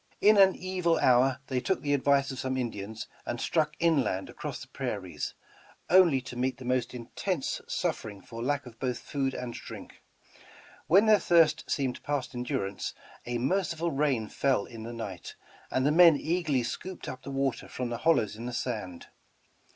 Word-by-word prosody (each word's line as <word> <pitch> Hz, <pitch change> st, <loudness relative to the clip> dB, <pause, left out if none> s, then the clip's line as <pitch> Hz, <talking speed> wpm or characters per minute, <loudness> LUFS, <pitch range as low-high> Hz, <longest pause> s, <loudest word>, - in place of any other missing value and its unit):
In 215 Hz, +1 st, +6 dB
an 190 Hz, -1 st, +7 dB
evil 180 Hz, -3 st, 0 dB
hour 130 Hz, +1 st, +4 dB
thev 130 Hz, -2 st, -1 dB
took 190 Hz, -, 0 dB
the 145 Hz, -1 st, +1 dB
advice 140 Hz, 0 st, +3 dB
of 130 Hz, -, -6 dB
some 130 Hz, 0 st, -2 dB
Indians 110 Hz, -3 st, -4 dB, 0.2 s
and 120 Hz, -, -4 dB
struck 155 Hz, +1 st, 0 dB
inland 140 Hz, -, +1 dB
across -, -, -6 dB
the -, -, -10 dB
prairies, -, -, -4 dB, 0.6 s
only 175 Hz, -7 st, +6 dB
to 130 Hz, -1 st, -9 dB
meet 130 Hz, +2 st, -1 dB
the 130 Hz, -, -10 dB
most 125 Hz, -1 st, 0 dB
intense 135 Hz, +7 st, -3 dB
suffering 105 Hz, -2 st, -2 dB
for 115 Hz, +4 st, -9 dB
lack 140 Hz, +2 st, -1 dB
of 115 Hz, -2 st, -13 dB
both 125 Hz, -2 st, -1 dB
food 135 Hz, +2 st, -2 dB
and 125 Hz, -1 st, -5 dB
drink. -, -, -10 dB, 0.9 s
When 195 Hz, +6 st, +6 dB
their 215 Hz, -1 st, +6 dB
thirst 165 Hz, -2 st, +3 dB
seemed 130 Hz, -3 st, -1 dB
past 145 Hz, -2 st, -2 dB
endurance, 125 Hz, -5 st, -3 dB, 0.3 s
a 120 Hz, 0 st, -1 dB
merciful 170 Hz, +4 st, 0 dB
rain 135 Hz, -6 st, +1 dB
fell 130 Hz, -5 st, +1 dB
in 115 Hz, -2 st, -10 dB
the 115 Hz, +2 st, -6 dB
night, 105 Hz, -7 st, -7 dB, 0.3 s
and 130 Hz, -, 0 dB
the 145 Hz, -, +4 dB
men 165 Hz, -1 st, +7 dB
eagerly 160 Hz, -6 st, 0 dB
scooped 185 Hz, +9 st, -6 dB
up 130 Hz, 0 st, -6 dB
the -, -, -8 dB
water 135 Hz, -3 st, -1 dB
from 125 Hz, -1 st, -4 dB
the 120 Hz, -, -3 dB
hollows 140 Hz, -10 st, +2 dB
in 115 Hz, +3 st, -6 dB
the 125 Hz, -, -5 dB
sand. 105 Hz, -8 st, -4 dB
130 Hz, 175 wpm, -29 LUFS, 120-155 Hz, 0.9 s, an